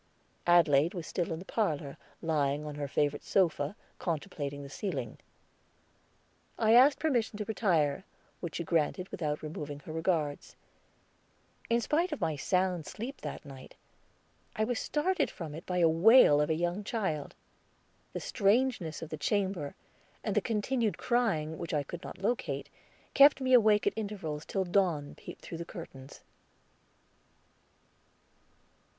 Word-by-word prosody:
Adelaide 165 -1 +5
was 170 -3 -5
still 175 +1 -2
in 160 - -2
the 180 - -9
parlor, 155 -12 -1 0.3
lying 150 -2 0
on 150 - -5
her 145 -1 -4
favorite 145 +1 0
sofa 165 -3 +1 0.2
contemplating 145 -4 -3
the - - -7
ceiling. 140 - -4 1.4
I 220 0 +4
asked 265 +4 +7
permission 240 -9 0
to 210 - -3
retire, 175 -9 +1 0.4
which 170 -3 -5
she 170 - -2
granted 170 +3 0
without 150 -3 -3
removing 150 -2 -6
her 155 - -8
regards. 160 -3 -1 1.1
In 235 0 +3
spite 330 +8 +1
of 300 - -3
my 160 - 0
sound 180 +2 0
sleep 250 +6 -6
that - - -6
night, 135 -2 -11 0.8
I 215 - +1
was 240 +1 -1
started 310 +1 0
from 160 -4 -7
it 160 +3 -9
by 180 -1 0
the 165 - +6
wail 165 - +6
of 150 - 0
a 160 - +2
young 175 +5 -1
child. 190 - -3 0.8
The - - -3
strangeness 205 -7 +1
of 160 - -7
the 155 - -3
chamber, 190 -4 -1 0.5
and - - -1
the - - +4
continued 225 0 0
crying, 190 -11 0
which 165 - -3
I 145 - +1
could 170 +5 -8
not - - -8
locate, 220 +6 -2 0.4
kept 280 +1 +7
me 260 -1 +1
awake 215 -4 +5
at - - +2
intervals 195 -9 -4
till 195 -1 -1
dawn 175 -6 +1
peeped - - -11
through 165 - -7
the - - -3
curtains. 140 -7 -10
175 Hz, 145 wpm, -31 LUFS, 150-215 Hz, 1.4 s, asked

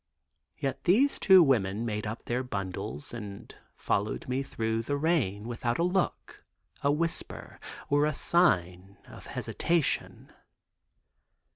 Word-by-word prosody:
Yet 135 -1 -3
these 240 +11 +3
two 190 -3 +7
women 110 -6 +1
made 105 -1 -3
up 110 +2 -6
their 125 +2 -1
bundles 95 - -5
and 105 -1 -8 0.2
followed 105 +10 -1
me 130 +1 -1
through 115 -4 -2
the 145 +5 -2
rain 130 - 0
without 120 0 -2
a 170 - +1
look, 180 +1 -1 0.4
a 140 - +3
whisper 165 +3 -3 0.3
or 145 +1 +3
a 155 - -1
sign 95 - +1
of - - -13
hesitation. 170 -4 -1
120 Hz, 125 wpm, -29 LUFS, 105-160 Hz, 0.4 s, two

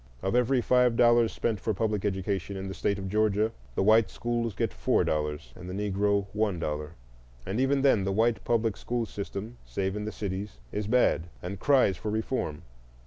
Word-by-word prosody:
Of 95 - 0
every 125 +1 +3
five 125 -1 +3
dollars 120 -1 +5
spent 110 -3 -1
for 110 +1 -1
public 105 -1 -1
education 95 0 -2
in 95 0 -5
the 95 - -5
State 100 0 0
of 95 -1 -5
Georgia, 105 +2 +2 0.2
the - - +1
white 110 +2 +5
schools 120 -3 -2
get - - -1
four - - +2
dollars 75 -5 -2
and 90 0 -9
the 90 - -5
Negro 100 0 +1
one 105 -3 0
dollar; 75 -1 -3 0.5
and 100 +5 -2
even 135 +1 +2
then 125 -8 +4
the 95 - 0
white 110 +1 +1
public 115 -3 +1
school 120 -1 -2
system, 105 +3 -6
save 95 0 -2
in 105 0 -3
the 110 - -3
cities, 100 0 -5
is 105 0 -3
bad 105 -8 +2
and 90 +2 -5
cries 130 -8 +3
for 110 - -4
reform. 110 - -2
105 Hz, 195 wpm, -28 LUFS, 95-115 Hz, 0.5 s, dollars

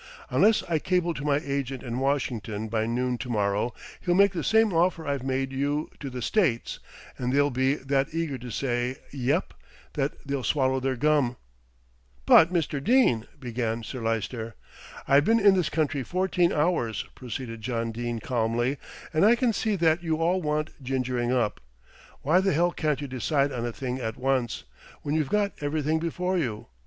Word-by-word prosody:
Unless 220 +1 +4
I 165 -3 +1
cable 180 0 +1
to 135 - -6
my 145 -1 +2
agent 135 -2 -3
in 120 -1 -3
Washin'ton 115 -6 -1
by 110 0 0
noon 125 +1 -1
to 125 - -5
morrow, 105 +1 0 0.3
he'll 175 -1 0
make 200 +1 +5
the 170 -5 -3
same 220 -2 +3
offer 170 0 +2
I've 140 -2 -1
made 135 0 -1
you 145 +3 -1
to 140 - -5
the 125 -2 -5
States, 145 - 0 0.4
and 125 0 -1
they'll 145 +1 +3
be 130 +2 +2
that 135 0 0
eager 160 -5 -2
to 125 +1 -8
say 125 +1 -1
'Yep,' 135 0 -1 0.4
that 140 -1 -1
they'll 140 -2 -2
swallow 130 -2 +1
their 130 0 -1
gum." 140 -2 +2 0.9
"But, 165 - +7
Mr. 155 -5 -1
Dene 225 - +3
" - - -29
began 115 -3 -3
Sir 125 +4 -6
Lyster. 115 0 -2 0.5
"I've 140 +1 +5
been 230 +1 +4
in 200 -2 +6
this 180 -4 +1
country 150 -3 0
fourteen 180 +4 +1
hours," 150 - 0
proceeded 115 -2 -6
John 115 0 -2
Dene 120 +1 -3
calmly, 120 +3 0 0.3
"and 155 - +3
I 220 +4 +6
can 240 -1 +1
see 215 0 0
that 165 -2 +2
you 160 -2 -1
all 175 +3 +1
want 150 -2 -2
gingering 125 -2 -1
up. 120 -4 0 0.6
Why 160 +6 +4
the 195 -2 +1
hell 175 +3 +2
can't 150 -4 -1
you 145 - -4
decide 140 +3 0
on 120 -2 -3
a - - -3
thing 130 +1 -4
at 110 -3 -4
once, 130 -2 0 0.4
when 145 - -2
you've 155 -3 0
got 205 -1 +1
everything 155 +2 0
before 180 +3 -1
you? 115 -9 -3
135 Hz, 180 wpm, -26 LUFS, 120-160 Hz, 0.9 s, But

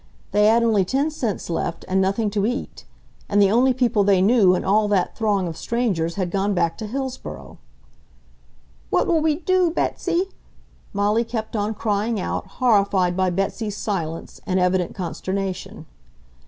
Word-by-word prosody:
They 210 +1 +4
had 230 +2 +4
only 215 -4 +3
ten 275 - 0
cents 235 -10 -3
left, 170 0 -3
and 190 +1 +2
nothing 200 +3 0
to 200 -1 0
eat. 245 +3 -5 0.4
And 205 - +2
the 200 -1 +5
only 250 +4 +4
people 240 -4 +2
they 195 -1 +4
knew 195 -2 +5
in - - -3
all 210 +2 +3
that 195 -3 0
throng 205 -5 0
of 165 - -5
strangers 180 -5 -1
had 185 -3 -2
gone 195 +1 0
back 165 -2 +1
to 215 - -4
Hillsboro. 260 +2 -6 1.3
"What - - +2
will 330 -2 +2
we 310 -1 +2
do, 365 +2 +2
Betsy?" 355 +2 -1 0.6
Molly 205 +3 +1
kept 230 -1 -5
on 210 +1 -1
crying 215 +1 -1
out, - - -3
horrified 200 -7 +2
by 185 0 +1
Betsy's 195 +3 -2
silence 165 -6 -4
and 185 0 +1
evident 180 -1 +1
consternation. 190 +1 -4
205 Hz, 160 wpm, -22 LUFS, 190-235 Hz, 1.3 s, the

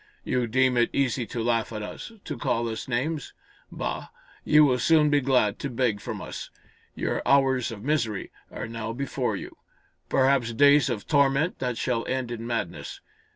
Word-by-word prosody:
You 125 -2 0
deem 130 +2 +2
it 120 - +3
easy 125 -3 0
to 115 - -3
laugh 115 -1 0
at 105 -1 -5
us 105 - -7
to - - -4
call 115 0 -1
us 110 -1 -5
names! 135 +4 -2 0.4
Bah! - - -4 0.4
You 150 0 +6
will 125 -3 +2
soon 150 +2 +4
be 145 -1 +4
glad 125 -6 +2
to 140 - -3
beg 120 -4 0
from - - -5
us! - - -7 0.5
Your - - -1
hours 135 -3 +3
of 105 -2 -8
misery 120 -8 -1 0.2
are - - -6
now 115 0 -5
before 140 +2 -2
you - - -8 0.5
perhaps 130 -3 +2
days 140 +2 +5
of 110 -5 -3
torment 140 +3 +2
that 125 -2 -2
shall 120 -2 -1
end 130 -2 -2
in 115 -1 -5
madness. 120 -1 -4
125 Hz, 175 wpm, -26 LUFS, 115-140 Hz, 0.5 s, You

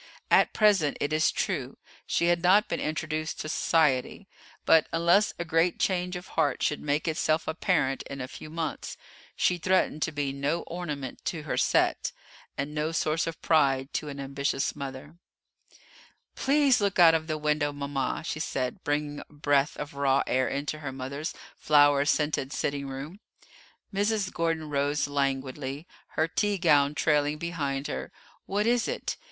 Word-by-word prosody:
At - - +5
present, 200 -9 +3
it 145 +2 -1
is 155 +1 +3
true, 140 - -2 0.3
she 170 - +1
had 175 0 +2
not 190 +4 +5
been - - -2
introduced 155 0 -3
to 155 - -5
society, 150 -6 +1 0.4
but 160 -1 +5
unless 170 +5 +3
a 170 - -3
great 165 +2 +2
change 180 -1 0
of 180 +1 -8
heart 155 -3 0
should 150 - 0
make 150 +2 -1
itself 155 0 0
apparent 160 -4 0
in 140 - -6
a 125 - -4
few 155 - -10
months, 160 -2 -4 0.4
she 180 -1 +1
threatened 185 -3 +1
to 160 - 0
be 145 -2 -2
no 145 +5 -1
ornament 150 -7 -6
to 160 -3 -3
her 155 - -2
set, - - +1 0.4
and 140 +2 -3
no 150 +1 -1
source 160 0 0
of 165 - -6
pride 135 -4 +2
to 150 - -2
an 140 0 -7
ambitious 140 0 -1
mother. 140 +3 -8 1.1
"Please 275 -3 +3
look 200 -2 0
out 170 -2 +8
of 160 0 0
the 155 -1 -1
window, 150 -1 0
mama," 140 -1 -3
she 155 - -3
said, 135 +3 -3
bringing 145 0 -1
a - - -9
breath 145 -1 +1
of 145 0 -6
raw 140 -1 +2
air 130 0 +1
into 150 +2 -3
her 145 -3 -5
mother's 135 +4 -5 0.2
flower 145 -1 +4
scented 150 -3 0
sitting 140 -1 -2
room. 140 +8 -7 0.7
Mrs. 205 -1 0
Gordon 165 -2 -1
rose 145 +1 0
languidly, 135 +1 -2 0.3
her 160 - +3
tea 205 +4 0
gown 150 -4 +3
trailing 150 0 +2
behind 145 -4 -3
her. 65 - -5 0.4
"What 205 +2 0
is 240 0 +2
it? - - -3
150 Hz, 165 wpm, -28 LUFS, 140-170 Hz, 1.1 s, out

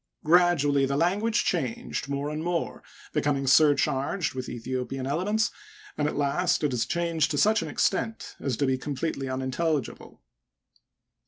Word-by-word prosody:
Gradually 155 -5 +4
the 140 +1 -1
lan^a^e 195 +8 +1
changed 140 - -1
more 140 +1 -2
and 155 +1 -4
more, 170 -1 -2 0.3
becoming 140 -1 0
surcharged 145 +3 +3
with 130 -1 -5
Aethiopian 130 +2 -4
elements, 205 +9 0 0.4
and 150 - 0
at - - -3
last 155 +5 +1
it 150 - +2
has 120 -2 -1
changed 165 -2 0
to 150 - -2
such 215 +7 +4
an 165 - -4
extent 200 +8 -1
as 130 -5 -2
to 140 - +1
be 130 -1 0
completely 140 0 -3
unintelligible. 130 +2 -2
145 Hz, 145 wpm, -27 LUFS, 135-170 Hz, 0.4 s, Gradually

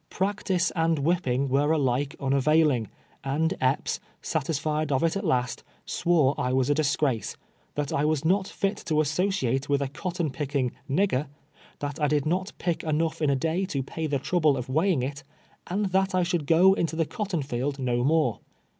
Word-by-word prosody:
Practice 190 -2 0
and 165 -1 +2
whipping 140 -4 +1
were 140 +3 +2
alike 140 -2 +1
nnavailing, 140 -2 +2 0.4
and 155 +6 0
Epps, 130 +2 +1 0.2
satisfied 155 -1 -1
of 135 +2 +1
it 165 +2 +2
at 195 - -2
last, 125 -8 0 0.2
swore 160 -6 +2
I 125 +1 0
was 130 +1 +2
a - - +5
disgrace 145 -6 0 0.2
— - - -38
that 145 -1 -2
I 140 - +1
was 155 0 0
not 190 +3 +2
fit 195 +1 -2
to 155 -2 +2
associate 155 -4 0
with 140 -1 +3
a 140 - -1
cot 175 +6 -5
ton 170 -5 -1
picking 135 -3 -1 0.2
"nigger" 150 -3 +1 0.3
— - - -27
^that 145 0 -4
I 150 - +3
could 145 -1 +1
not 185 +5 -1
pick 175 -2 -1
enough 160 +1 -1
in 150 - +2
a 140 - +3
day 165 +7 0
to 140 -7 -2
pay 160 +4 -4
the 145 -2 0
trouble 155 0 +2
of 125 0 -5
weighing 160 0 +2
it, 140 +2 -4 0.5
and 200 +4 -1
that 190 0 +1
I 180 - +3
should 170 -4 -1
go 180 +4 +6
into 165 -4 -1
the 165 0 +1
cotton 195 -5 -3
field 135 +2 -2
no 120 -2 0
more. 150 -4 +2
150 Hz, 190 wpm, -26 LUFS, 135-170 Hz, 0.5 s, go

